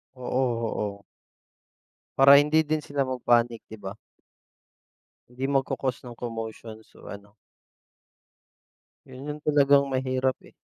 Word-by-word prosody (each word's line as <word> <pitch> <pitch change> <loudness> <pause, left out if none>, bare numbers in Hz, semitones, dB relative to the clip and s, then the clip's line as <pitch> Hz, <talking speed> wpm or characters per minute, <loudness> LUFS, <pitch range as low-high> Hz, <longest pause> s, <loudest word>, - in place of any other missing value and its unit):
Oo, 125 -2 -1 0.2
oo. 100 -1 -6 1.1
Para 140 +1 +8
hindi 150 +2 +4
din 155 0 -1
sila 145 -1 -3
mag-panic 120 -3 +1
'di 110 - -11
ba? 95 0 -6 1.4
Hindi 125 +2 -8
magko-cause 130 -1 -1
ng 120 -2 -10
commotion 115 -1 -7
so, - - -17
ano 100 0 -11 1.7
yun 130 +2 -10
yung 150 - -14
talagang 140 -1 +4
mahirap, 130 0 0
eh. - - -20
130 Hz, 115 wpm, -26 LUFS, 115-140 Hz, 1.7 s, Para